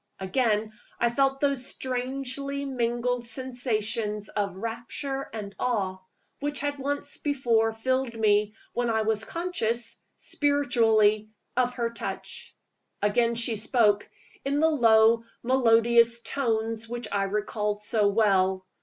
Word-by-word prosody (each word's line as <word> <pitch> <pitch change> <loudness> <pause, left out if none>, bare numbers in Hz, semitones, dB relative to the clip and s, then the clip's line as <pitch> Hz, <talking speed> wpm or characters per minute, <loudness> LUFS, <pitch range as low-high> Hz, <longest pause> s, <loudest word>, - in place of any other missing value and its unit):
Again 215 +2 0 0.3
I 235 0 +2
felt 270 +2 +1
those 280 -3 +2
strangely 270 +2 -3
mingled 240 -1 -1
sensations 225 -4 -2
of 200 -3 -2
rapture 240 +6 -5
and 210 -3 -6
awe, 200 -7 -1 0.4
which 290 0 -1
had 290 0 -2
once 285 +1 -1
before 235 -6 +1
filled 255 +2 -1
me 210 -1 +2 0.2
when 240 0 0
I 220 -1 +1
was 220 0 0
conscious, 240 -10 -1 0.2
spiritually, 225 -7 +2 0.3
of 250 0 +1
her 235 -2 -1
touch. 235 - -7 0.5
Again 235 +3 +2
she 230 -1 +2
spoke, 210 -1 +2 0.3
in 280 +1 0
the 320 +1 +4
low, 230 -4 +5 0.2
melodious 235 -1 +4
tones 225 -3 -1
which 240 -1 -4
I 200 -1 +1
recalled 210 +1 -2
so 210 -1 +3
well. 190 -3 +2
235 Hz, 120 wpm, -27 LUFS, 215-260 Hz, 0.5 s, low